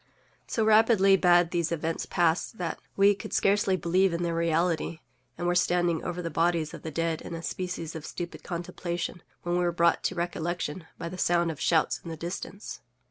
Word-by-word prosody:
So 225 - 0
rapidly 215 -3 +5
had 175 -1 +5
these 170 -2 0
events 165 0 -2
passed, 170 +5 +1
that 175 -2 -3 0.2
we 200 +1 +5
could 200 - -8
scarcely 195 -1 +3
believe 180 +2 +2
in 170 - -2
their 170 -1 -1
reality, 165 0 0 0.4
and 175 - -3
were 175 - +2
standing 175 -2 +2
over 180 0 -4
the 165 - -3
bodies 165 -1 +1
of - - -8
the 160 - -5
dead 165 +1 -1
in 170 - -6
a 165 - -7
species 180 -3 -4
of 160 - -6
stupid 175 +2 -6
contemplation, 175 0 -4 0.2
when 175 0 0
we - - +1
were 175 - +2
brought 170 0 +3
to 185 - 0
recollection 175 -1 -3
by 170 - -5
the 180 +2 -7
sound 170 -1 +2
of 150 - -9
shouts 160 -2 +2
in 170 - -7
the 160 - -5
distance. 180 +4 -6
175 Hz, 195 wpm, -28 LUFS, 165-180 Hz, 0.4 s, rapidly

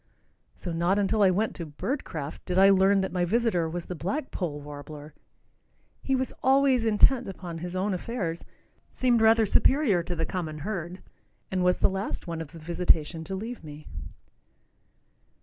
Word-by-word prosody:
so 175 - -6
not 170 +4 +1
until 205 +1 +1
I 195 - +6
went 205 +4 0
to 170 - -5
"Birdcraft" 160 - -4
did 180 - -1
I 195 +1 +7
learn 195 +1 +4
that 190 - -2
my 180 -1 0
visitor 180 -4 +1
was 175 +1 -5
the - - -5
black 225 - -3
poll 155 -6 -3
warbler. 145 +1 -9 0.9
He 270 - 0
was 260 0 -2
always 265 -2 +3
intent 230 +3 +4
upon 175 -3 -7
his 175 +2 -6
own 195 +2 0
affairs, 180 -4 -3 0.5
seemed 245 -3 +2
rather 225 0 +5
superior 230 - +3
to 175 +1 -4
the 165 -1 -1
common 160 -4 -4
herd, 180 -3 -5 0.5
and 185 -1 0
was 180 0 +3
the - - +3
last 195 +1 -4
one 165 -2 -4
of 160 - -8
the 165 - -11
visitation 165 -1 0
to 190 - -4
leave 225 +3 -6
me. 150 0 -10
185 Hz, 170 wpm, -27 LUFS, 165-220 Hz, 0.9 s, I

